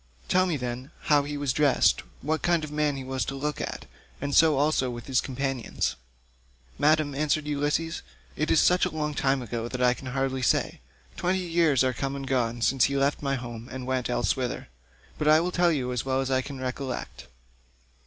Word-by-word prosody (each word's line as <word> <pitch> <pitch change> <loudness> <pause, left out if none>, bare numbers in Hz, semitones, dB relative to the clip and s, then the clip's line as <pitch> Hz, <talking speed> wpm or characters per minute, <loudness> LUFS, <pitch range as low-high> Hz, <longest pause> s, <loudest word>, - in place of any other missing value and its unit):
Tell 185 0 +3
me, 165 -4 0
then, 125 +1 -5 0.2
how 145 - +6
he 145 +1 -4
was 140 -3 0
dressed, 145 -3 +3 0.2
what 155 +3 0
kind 170 -2 +2
of 155 - -5
a - - -8
man 150 -1 +1
he 135 - -5
was 130 0 -2
to 135 - -4
look 150 +2 -3
at, - - -5 0.3
and 140 0 -3
so 155 -2 +5
also 145 -2 +2
with 120 -2 -7
his 130 -1 +2
companions." 135 -2 -2 0.8
"Madam," 150 -1 +3
answered 150 +1 0
Ulysses, 150 +3 -1 0.3
"it 155 - -1
is 160 - +5
such 180 0 +4
a 185 - +3
long 150 -2 -2
time 135 -2 +1
ago 115 0 -4
that 125 +1 -5
I 125 0 +5
can 130 - -10
hardly 130 0 -1
say. 120 - +1 0.4
Twenty 185 +1 +1
years 165 -6 +3
are 130 0 +1
come 135 +2 -3
and 135 -1 -5
gone 120 -3 0
since 130 +2 +4
he 140 0 0
left 140 +1 +1
my 140 -1 0
home, 120 -2 -7
and 130 0 -6
went 130 -1 -1
elsewhither; 125 - -1 0.5
but 150 - 0
I 155 +1 +7
will 175 +2 -1
tell 175 -1 +3
you 130 -5 -1
as 125 -2 -1
well 130 0 0
as 135 0 -1
I 130 0 +3
can 135 0 -8
recollect. 130 0 -5
135 Hz, 210 wpm, -27 LUFS, 130-150 Hz, 0.8 s, I